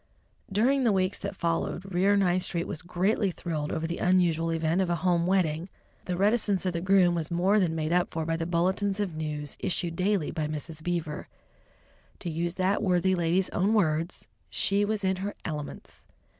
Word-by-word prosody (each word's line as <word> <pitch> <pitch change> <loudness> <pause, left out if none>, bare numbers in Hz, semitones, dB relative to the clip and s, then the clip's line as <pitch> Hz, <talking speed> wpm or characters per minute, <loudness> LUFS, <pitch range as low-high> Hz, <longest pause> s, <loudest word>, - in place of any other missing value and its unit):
During 255 +7 +3
the 235 - +4
weeks 190 0 0
that 200 0 -5
followed, 175 +2 -2
Rear 195 +3 +3
Ninth 185 -2 +2
Street 175 -1 -2
was 155 - -4
greatly 190 +4 +1
thrilled 155 -4 -3
over 160 - -2
the 170 +1 -3
unusual 170 -3 +2
event 165 +2 +1
of 185 - 0
a 175 - +2
home 175 -1 +3
wedding. 175 -2 +1 0.4
The 180 -1 -2
reticence 205 -1 +2
of 180 - 0
the 170 - -2
groom 185 -1 +4
was 165 -3 -2
more 185 +5 +3
than 170 -4 +1
made 155 +1 -1
up 180 +3 +2
for 160 -1 -2
by 165 0 0
the 165 0 -3
bulletins 190 +4 0
of 190 -6 -2
news 150 -2 -4
issued 170 -2 -1
daily 185 -2 +1
by 155 -2 -2
Mrs. 155 +1 -6
Beaver. 170 -1 -3 0.9
To 175 - -5
use 170 +2 -2
that 190 +2 +1
worthy 190 -2 +2
lady's 175 +1 +1
own 200 +5 +2
words, 165 -3 0 0.2
"she 200 +1 +1
was 210 0 -1
in 190 0 +1
her 200 +2 -4
elements!" 150 -3 -6
180 Hz, 190 wpm, -28 LUFS, 165-195 Hz, 0.9 s, the